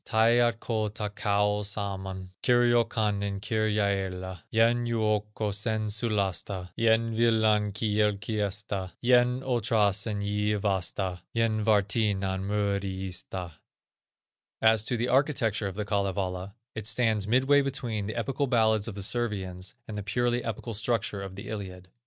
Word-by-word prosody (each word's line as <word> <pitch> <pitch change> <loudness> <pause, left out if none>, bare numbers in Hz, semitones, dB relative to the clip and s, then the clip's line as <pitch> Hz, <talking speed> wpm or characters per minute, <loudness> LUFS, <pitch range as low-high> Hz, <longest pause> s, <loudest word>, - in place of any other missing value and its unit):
Taiatko 115 -1 +2
takoa 105 -1 0
sammon, 95 -2 -4
Kirjokannen 115 -5 +2
kirjaëlla, 100 -4 -1
Yhen 120 +2 +3
joukkosen 105 -1 -1
sulasta, 100 -4 -1
Yhen 115 0 +2
willan 110 -2 +3
kylkyesta, 105 -2 -1
Yhen 125 +1 +4
otrasen 105 -4 +1
jywasta, 100 -3 -1 0.2
Yhen 110 -2 +1
warttinan 100 -2 +1
muruista." 95 -3 -2 1.1
As 110 -1 +4
to 120 - -1
the 120 +2 0
architecture 125 -6 +1
of 95 - -6
the 105 0 -3
Kalevala, 100 -2 -2 0.2
it 110 -2 -5
stands 110 -3 +1
midway 135 +5 +4
between 120 -7 -2
the 110 - -4
epical 135 +4 -1
ballads 110 -4 +2
of 110 - -5
the 100 - -3
Servians 95 -5 -2
and 110 - -6
the 105 - -3
purely 120 +4 0
epical 115 +1 -4
structure 110 -2 -1
of 95 -1 -7
the 100 - -8
Iliad. 95 -4 -7
105 Hz, 115 wpm, -28 LUFS, 100-115 Hz, 1.1 s, Yhen